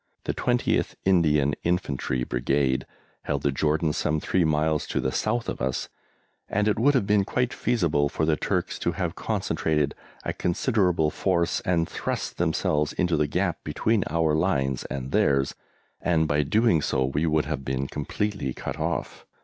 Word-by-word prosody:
The - - -1
20th 120 -1 0
Indian 75 -6 +3
Infantry 70 -7 -1
Brigade 65 +2 0 0.4
held - - -1
the 70 - +2
Jordan 75 +2 +1
some 75 +1 0
three 90 +3 +1
miles 75 0 +1
to - - -1
the 65 - 0
south 120 - -1
of - - -4
us, 65 0 -2 0.6
and 105 +1 +1
it 105 - +1
would 140 +4 +4
have 125 - +2
been 105 0 +3
quite 125 +5 -1
feasible 80 -12 +1
for 80 - -1
the 80 -1 +3
Turks - - -2
to - - 0
have - - -2
concentrated 75 -2 -1 0.3
a - - -2
considerable 90 - +1
force 85 -1 +1
and 85 -3 0
thrust - - -4
themselves 75 0 +1
into 90 -2 +1
the 75 -1 +1
gap 90 +2 -1
between 100 +7 +1
our 80 -1 +2
lines 70 -6 0
and 65 0 -5
theirs, 70 -1 +2 0.5
and 80 -3 +2
by 75 0 +1
so - - +3
doing 110 -8 +3 0.3
we 75 +3 +1
would 80 -1 +2
have 75 -3 -3
been 65 0 -2
completely 75 0 -3
cut - - -5
off. - - -3
80 Hz, 165 wpm, -26 LUFS, 70-95 Hz, 0.6 s, would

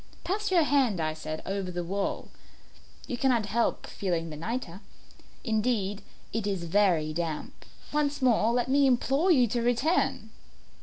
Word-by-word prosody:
"Pass 415 +3 -1
your 355 -3 +4
hand," 265 - +2
I 155 -1 0
said, 155 0 -6
"over 195 -1 -3
the 175 -1 -3
wall; 195 +3 -3 0.8
you 245 - -4
cannot 240 -3 +2
help 230 +3 0
feeling 170 -4 -3
the - - -6
nitre. 195 +2 -5 0.6
Indeed, 215 -4 0 0.3
it 220 -2 -1
is 195 -4 -2
very 170 -4 +2
damp. 160 -2 -4 0.3
Once 290 -1 0
more 230 -4 +3
let 245 +1 +1
me 275 +1 +4
implore 270 +7 +2
you 265 -8 +6
to 240 +2 0
return. 245 +9 +1
220 Hz, 150 wpm, -28 LUFS, 180-260 Hz, 0.8 s, you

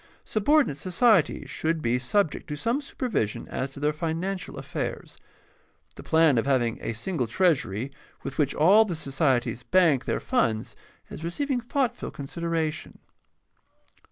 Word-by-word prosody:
Subordinate 245 - +2
societies 185 - +2
should 160 +2 -1
be 125 -4 0
sub 160 +7 +1
ject - - -9
to 150 - -4
some 235 - -1
supervision 240 - -2
as 135 - -3
to 135 - -11
their 150 +1 +1
financial 170 +4 -3
affairs. - - -5 0.7
The - - -11
plan 160 -6 +4
of 115 - -2
having 120 -4 +1
a 115 - -3
single 130 - -2
treasury 130 - +1 0.3
with 135 - -6
which 145 -2 +1
all 195 +8 +6
the 190 -6 -3
societies 135 -5 0
bank 165 -8 +3
their - - -1
funds 170 - 0 0.4
is - - -8
receiving 255 - -1
thoughtful 250 0 -1
consideration. 160 +2 -3
160 Hz, 140 wpm, -26 LUFS, 135-195 Hz, 0.7 s, all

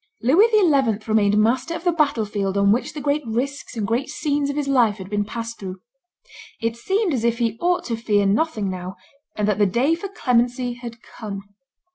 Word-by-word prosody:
Louis 325 - +5
XI. 285 - +3
remained 210 -1 +3
master 250 +9 +1
of 330 - -6
the 355 - +3
battle 290 -9 +1
field 200 -1 -2
on 200 0 +4
which 250 +7 0
the 300 - -4
great 290 +1 +1
risks 255 +3 -3
and 215 - -1
great 235 +7 -1
scenes 290 -1 -1
of 285 - -3
his 295 -1 -2
life 240 -7 +3
had 190 +1 -9
been 205 0 +1
passed 230 +2 -6
through. 190 -1 -7 0.8
It 230 0 -1
seemed 385 - 0
as 240 -4 -1
if 235 0 +1
he 230 -2 0
ought 355 0 +1
to 235 - -2
fear 210 -3 +1
nothing 215 +1 +1
now, 185 0 -5 0.4
and 210 -1 0
that 210 -1 +1
the 205 - +4
day 250 - +2
for 340 +4 -3
clemency 245 - 0
had 235 -1 -10
come. 200 -3 -7
235 Hz, 205 wpm, -22 LUFS, 210-285 Hz, 0.8 s, Louis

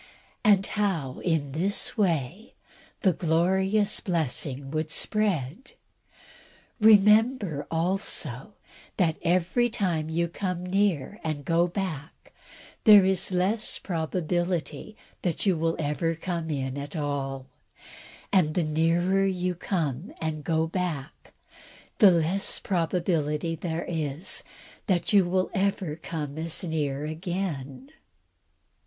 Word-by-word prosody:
and 200 -2 +4
how, 175 -11 -2
in 160 -5 -1
this 185 +8 0
way, 180 - -1 0.5
the 190 -4 +3
glorious 190 +6 +1
blessing 140 -5 -2
would 155 0 -2
spread? 200 - +1 1.1
Remember, 210 - +4
also, 165 - +1 0.4
that 170 -4 +1
every 185 +8 +1
time 175 -9 -1
you 170 +1 0
come 180 0 -4
near 195 -2 0
and 150 -3 -4
go 170 +2 +2
back, 175 -5 -6 0.5
there 205 -4 +8
is 190 0 +2
less 190 +5 +1
probability 175 +1 -3 0.2
that 175 +1 -1
you 190 -3 +3
will 165 0 0
ever 165 +2 -1
come 170 -1 -4
in 135 -2 -3
at 145 +3 -7
all; 140 -3 -3 0.9
and 160 -6 +3
the 175 - +2
nearer 170 +5 +1
you 180 -1 -1
come 165 -3 -3
and 155 -2 -3
go 160 0 +1
back, 165 -5 -5 0.7
the 205 - +8
less 175 +3 +2
probability 165 -3 -1
there 165 0 -4
is 160 0 0 0.5
that 180 -1 0
you 195 -3 +6
will 185 +1 0
ever 190 -5 -1
come 155 -3 -6
as 165 +2 -1
near 150 -4 -2
again. 170 - -5
170 Hz, 110 wpm, -26 LUFS, 155-190 Hz, 1.1 s, there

